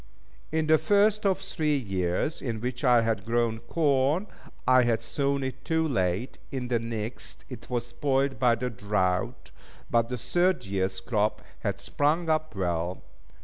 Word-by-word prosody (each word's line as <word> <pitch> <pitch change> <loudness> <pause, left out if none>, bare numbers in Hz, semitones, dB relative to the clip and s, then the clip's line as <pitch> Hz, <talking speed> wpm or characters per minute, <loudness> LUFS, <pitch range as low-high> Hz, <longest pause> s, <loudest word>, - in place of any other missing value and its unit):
In 160 0 +1
the 155 0 +5
first 210 0 +3
of 190 -2 +2
the 195 - -11
three 155 -6 0
years 95 - -1
in 115 -4 -3
which 125 +2 -4
I 120 -3 +5
had 110 -3 0
grown 115 0 0
corn, 145 - +1 0.4
I 130 0 +7
had 120 -2 +2
sown 140 +2 0
it 130 0 -5
too 160 -1 +1
late; 95 - -1
in 125 -2 -3
the 120 -2 +2
next, 110 -3 -5
it 120 -3 -9
was 120 -2 -1
spoilt 135 +3 0
by 125 -2 +4
the 125 +2 -3
drought; 95 -3 -1 0.4
but 115 0 +3
the 125 - -2
third 175 - +1
years' 95 -1 -1
crop 105 0 0 0.2
had 100 -3 -2
sprung 155 +9 0
up 155 -3 -1
well. 90 -1 -2
120 Hz, 165 wpm, -27 LUFS, 105-145 Hz, 0.4 s, I